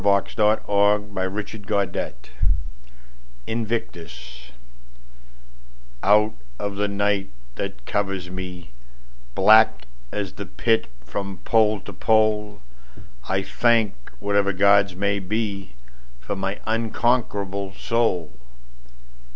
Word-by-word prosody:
William 100 -1 +5
Ernest - - -14 0.3
Henley1849–1903 100 - -1 1.2
Invictus 80 - -5 1.5
OUT 105 +2 +4 0.2
of 100 -1 -3
the 105 0 +1
night 100 0 0 0.2
that - - -5
covers 95 -3 -2
me, 90 -3 -7 0.6
Black 110 +3 +6 0.3
as 100 -3 -3
the - - -7
Pit 110 - +1 0.2
from 100 +7 -5
pole 110 -2 +3
to - - -9
pole,I 95 - -1
thank 115 -1 +2 0.3
whatever 100 -1 +1
gods 100 0 +4
may 100 +1 0
beFor 60 - -5
my 95 +1 -3
unconquerable 110 -4 0
soul. 105 -10 0
100 Hz, 85 wpm, -23 LUFS, 90-105 Hz, 1.5 s, Black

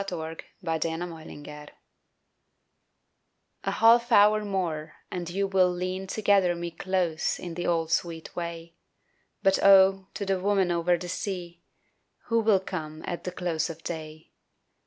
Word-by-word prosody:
DUSK 195 -1 -5 0.5
IN 165 +1 -2
WAR 160 -1 -11
TIME 145 - -10 2.2
A - - +1
HALF 235 +1 +5
HOUR 210 0 +6
more 175 -6 -3 0.2
and 175 -2 -4
you 195 +3 0
will 190 -2 +3
lean 185 +2 -3
To 215 +3 -5
gather 195 -4 +4
me 170 0 -5
close 175 -2 -1
in 175 -2 -7
the 175 +1 -3
old 165 -2 0
sweet 165 -1 -2
way 170 -1 -5 0.7
But 195 -1 +3
oh, 195 -1 +6
to 200 - -3
the 195 -1 0
woman 195 -1 +2
over 175 +1 +2
the 180 +1 -7
sea 175 -1 -5 0.7
Who 230 0 +3
will 215 -3 +4
come 155 -5 -6
at 175 - -5
the 180 - -2
close 170 -3 -2
of 165 0 -9
day? 155 -1 -7
180 Hz, 150 wpm, -27 LUFS, 165-195 Hz, 2.2 s, HOUR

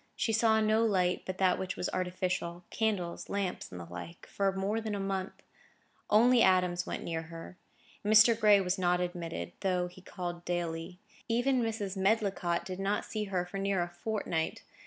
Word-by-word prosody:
She 225 - 0
saw 220 0 +4
no 215 +1 +3
light 185 -5 +2
but 185 0 -3
that 185 -2 +3
which 185 -1 -3
was - - -2
artificial—candles, 180 +1 -2
lamps, 200 -2 -3
and 90 - -7
the 85 - -7
like—for 170 - -3
more 200 +4 -1
than 215 -2 -3
a - - -3
month. 195 -1 -3 0.7
Only 240 +3 +6
Adams 180 -1 +3
went - - -4
near 165 -1 -2
her. 165 +2 -10 0.4
Mr. 215 +2 +7
Gray 210 -2 +6
was 185 +1 -1
not 180 -1 +2
admitted, 175 -2 -4
though 180 -2 +1
he 180 +1 -11
called 175 -2 -6
daily. 175 0 -3 0.3
Even 245 +3 +2
Mrs. 215 -4 -2
Medlicott 195 -3 +1
did 185 0 -5
not 200 +2 0
see 215 -1 -3
her 185 -3 -1
for 195 +2 -6
near 195 -2 +1
a 175 - -5
fortnight. 175 -3 -3
185 Hz, 170 wpm, -31 LUFS, 175-210 Hz, 0.7 s, Mr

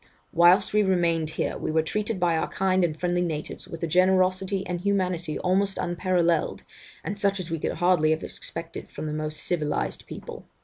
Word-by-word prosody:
Whilst 175 +4 +5
we 210 - +5
remained 170 -5 +1
here, 160 - -2
we - - -3
were 160 0 +2
treated 210 +4 -2
by 175 -2 +2
our 160 - 0
kind 185 -1 +1
and 160 -2 -1
friendly 175 0 +1
natives 155 -3 -4
with 165 0 -8
a - - +1
generosity 185 +2 +2
and 175 -1 -3
humanity 180 -5 0
almost 195 +2 +1
unparalleled, 175 -2 0 0.4
and 200 +5 -4
such 200 -1 +1
as 175 -2 -6
we 165 - -1
could - - -1
hardly 175 -3 +3
have 155 0 +1
expected 165 0 -7
from 150 - -6
the 150 - -3
most 155 0 -3
civilized 150 -4 -2
people. - - -9
175 Hz, 185 wpm, -26 LUFS, 160-185 Hz, 0.4 s, Whilst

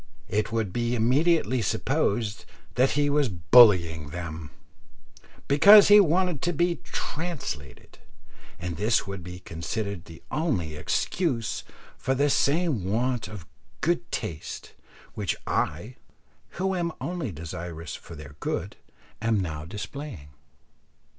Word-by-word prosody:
It 105 +2 0
would 110 -5 -1
be 120 0 0
immediately 130 +3 +2
supposed 105 +1 -1 0.3
that 130 +2 +3
he 145 0 +2
was 145 -2 +2
bullying 85 - +5
them, 80 -1 -6 1.0
because 200 +9 +8
he 205 0 +9
wanted 180 -3 +2
to 175 - 0
be 170 +2 +1
"translated;" 145 - -6 0.6
and 85 -2 -5
this 110 +5 +2
would 100 -2 -6
be 90 +1 -9
considered 95 +3 -4
the 80 0 -13
only 100 - -1
excuse 115 - -1 0.4
for 135 - 0
the 140 +2 +2
same 145 - +1
want 115 +4 -1
of 95 -4 -9 0.4
"good 170 +2 0
taste" 85 -9 -5 0.4
which - - -2
I, 105 +12 -2 0.6
who 190 +2 0
am 170 -3 -1
only 170 - -3
desirous 80 0 -7
for 85 - -10
their 75 -1 -11
good, - - -3 0.4
am 115 -2 +2
now 80 -5 -4
displaying. 105 - -7
110 Hz, 120 wpm, -26 LUFS, -, 1.0 s, he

